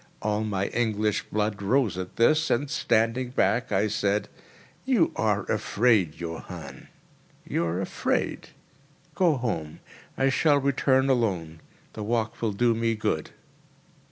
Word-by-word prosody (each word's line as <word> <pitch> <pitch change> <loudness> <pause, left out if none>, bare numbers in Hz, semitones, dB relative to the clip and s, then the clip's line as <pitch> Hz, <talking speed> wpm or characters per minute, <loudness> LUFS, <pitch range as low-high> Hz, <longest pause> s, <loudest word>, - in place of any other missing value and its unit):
All 105 0 0
my 100 -3 -1
English 110 -3 0
blood 105 -1 -1
rose 110 -1 +1
at 90 0 -6
this, 155 +7 +3
and, 135 +5 +1
standing 120 -4 +1
back, 120 -1 +1
I 100 +2 +2
said: 105 -1 0 0.5
"You 245 -11 +2
are 105 -2 +1
afraid, 105 -9 +1
Johann—you 85 -1 -7
are 85 +2 -1
afraid. 95 - -2 0.6
Go 170 -2 +3
home; 85 - -3 0.4
I 135 0 +3
shall 145 +2 +3
return 135 -1 +2
alone; 95 -11 0 0.3
the 110 - -7
walk 110 +1 -2
will 115 -2 0
do 120 +3 +2
me 115 0 0
good." 80 -7 -2
110 Hz, 125 wpm, -26 LUFS, 100-125 Hz, 0.6 s, this